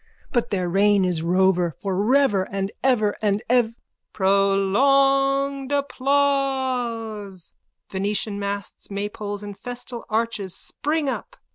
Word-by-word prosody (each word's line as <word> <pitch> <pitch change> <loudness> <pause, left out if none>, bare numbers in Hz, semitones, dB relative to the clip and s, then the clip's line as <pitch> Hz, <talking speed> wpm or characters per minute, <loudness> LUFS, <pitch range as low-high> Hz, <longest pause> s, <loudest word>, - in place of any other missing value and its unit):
But 240 -3 0
their 185 -3 -1
reign 200 +2 +3
is 175 -3 0
rover 180 -1 +2
for 195 -2 -3
rever 210 -2 +3
and 195 0 -2
ever 230 -6 +2
and 205 -1 +1
ev... 240 -3 +3 0.4
_(Prolonged 275 +8 +3
applause. 260 -8 -1 0.3
Venetian 200 +1 -2
masts, 200 -1 -5
maypoles 205 0 -4
and 205 -1 -7
festal 245 +1 -7
arches 215 -4 -1
spring 300 0 -2
up. 275 - -4
210 Hz, 110 wpm, -23 LUFS, 195-265 Hz, 0.4 s, reign